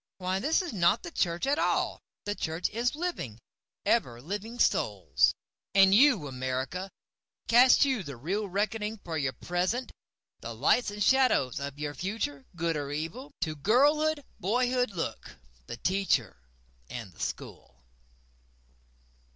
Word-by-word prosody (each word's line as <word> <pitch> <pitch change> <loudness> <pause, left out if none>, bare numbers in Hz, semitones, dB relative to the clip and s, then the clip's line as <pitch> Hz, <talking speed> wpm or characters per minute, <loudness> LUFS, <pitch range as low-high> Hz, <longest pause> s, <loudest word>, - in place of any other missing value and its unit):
Why 185 0 -1
this 310 - +1
is 345 - -5
not 180 +2 +3
the 345 - -7
church 170 - 0
at 280 +2 +1
all—the 205 - -2
Church 165 -2 -2
is 240 +4 0
living, 310 - -4 0.5
ever 120 0 +1
living 205 - -5
Souls.")And 195 -4 +2
you, 230 - +5
America, 130 +8 -3 0.6
Cast 250 +4 +6
you 260 -6 0
the 140 -7 -8
real 195 - -2
reckoning 210 +3 -1
for 165 - -4
your 135 -4 -1
present? 185 +9 -2 0.5
The - - -7
lights 245 - +3
and 205 0 -2
shadows 255 - +3
of 140 0 -5
your 145 0 -4
future—good 170 -3 -3
or 145 -1 -3
evil? 165 - -5
To 155 -2 -1
girlhood, 290 - +3 0.2
boyhood 250 +5 +1
look—the 65 - -7
Teacher 185 - +1 0.5
and 115 -7 -7
the - - -21
School. 65 -1 -6
190 Hz, 125 wpm, -29 LUFS, 145-240 Hz, 0.6 s, Cast